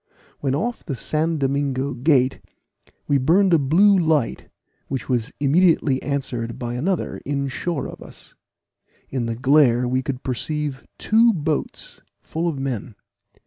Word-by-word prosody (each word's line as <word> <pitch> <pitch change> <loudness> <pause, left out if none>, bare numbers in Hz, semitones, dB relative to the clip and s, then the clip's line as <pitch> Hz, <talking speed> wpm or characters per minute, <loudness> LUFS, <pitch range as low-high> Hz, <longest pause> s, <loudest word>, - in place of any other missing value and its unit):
When 135 -1 0
off 235 +10 -2
the 140 - -4
San 155 +7 -1
Domingo 140 -1 -1
Gate, 130 0 +2 0.7
we 140 -1 +3
burned 175 +7 +3
a 165 - +6
blue 180 +9 +4
light, 160 -8 0 0.4
which 130 -3 -4
was 125 0 0
immediately 145 -2 +3
answered 125 -5 -3
by 120 -1 -4
another 170 +9 -2
in 140 0 -2
shore 165 +3 -3
of - - -10
us. - - -13 0.8
In 125 -3 -2
the 115 - -2
glare 125 -1 +4
we 130 +1 0
could 130 0 -5
perceive 145 +2 -3
two 225 +1 +4
boats, 155 -3 -3 0.2
full 165 +2 -3
of 160 -4 -2
men. 125 -5 -4
140 Hz, 145 wpm, -22 LUFS, 130-160 Hz, 0.8 s, a